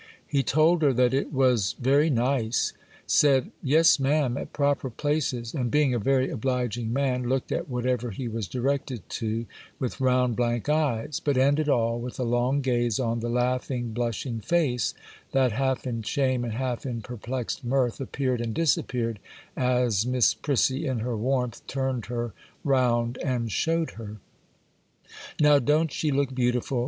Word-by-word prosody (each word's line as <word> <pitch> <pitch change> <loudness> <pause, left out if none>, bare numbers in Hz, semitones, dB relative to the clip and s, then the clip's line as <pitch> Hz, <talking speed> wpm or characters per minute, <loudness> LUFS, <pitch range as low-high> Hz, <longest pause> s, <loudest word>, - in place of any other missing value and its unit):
He 140 -2 +1
told 155 +6 +3
her 140 -3 +4
that 125 0 +3
it 135 +3 0
was 125 -8 +2
very 140 +5 +3
nice,—said, 130 +2 +1
'Yes, 155 +3 +5
ma'am,' 135 -2 +1
at - - -5
proper 140 -2 0
places,—and, 130 -2 -2
being 145 +1 +2
a 120 - 0
very 130 +4 +1
obliging 120 -2 -2
man, 125 -2 0
looked 130 0 -1
at - - -2
whatever 125 -1 -1
he 120 +4 -5
was 110 -3 -4
directed 130 -3 -2
to, 115 +1 -2 0.3
with 130 +1 -4
round, 125 -2 +2
blank 120 0 -1
eyes; 150 -3 0
but 145 -3 +1
ended 145 +3 +3
all 115 -2 +1
with 125 +2 -7
a - - 0
long 120 +4 +1
gaze 120 -4 0
on 115 -2 0
the 120 +1 -3
laughing, 125 -1 -1
blushing 120 0 -2
face, 125 -2 0 0.4
that, 130 -2 +3
half 130 +3 -1
in 115 -3 -3
shame 130 +2 0
and 115 -2 -3
half 125 0 -2
in 120 -4 -4
perplexed 125 +3 -5
mirth, 125 0 0
appeared 130 -2 -1
and 115 -2 -3
disappeared 120 -8 0 0.4
as 125 -5 +2
Miss 125 -1 +3
Prissy 140 +1 0
in 130 -4 -1
her 120 +1 -2
warmth 125 +1 -1
turned 130 -3 -2
her 120 -2 -3 0.3
round 125 -3 +1
and 120 -4 -1
showed 165 - 0
her. 110 -1 -9 1.2
'Now, 150 -1 +6
don't 150 +4 +2
she 155 - -1
look 140 -1 0
beautiful? 125 0 0
125 Hz, 155 wpm, -26 LUFS, 120-135 Hz, 1.2 s, Now